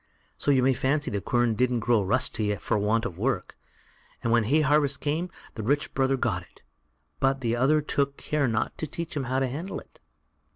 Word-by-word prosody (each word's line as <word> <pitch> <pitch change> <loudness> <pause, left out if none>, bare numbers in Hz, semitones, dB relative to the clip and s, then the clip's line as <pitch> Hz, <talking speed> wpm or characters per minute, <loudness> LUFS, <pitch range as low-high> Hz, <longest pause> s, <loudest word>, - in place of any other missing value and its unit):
So - - -2
you 135 -3 +4
may 135 +1 +4
fancy 140 +4 0
the 100 - -2
quern 120 +1 +1
didn't 125 +1 +1
grow 115 -1 +3
rusty 105 0 +1
for - - -2
want 110 +3 +1
of 90 -6 -5
work, 115 -5 -1 0.7
and 115 - +1
when 115 -2 +3
hay 150 +8 +3
harvest 145 -1 +2
came, 160 +5 -1 0.2
the 110 - -5
rich 145 +7 0
brother 135 0 +2
got - - 0
it, - - -21 0.6
but 135 0 +1
the 115 -2 0
other 140 +5 +3
took 140 -1 -1
care 150 -3 0
not 110 -2 -1
to 155 - -2
teach 165 +2 -5
him 140 -3 -1
how 130 +2 -1
to 135 0 +1
handle 155 +10 -5
it. - - -19
130 Hz, 205 wpm, -27 LUFS, 115-145 Hz, 0.7 s, you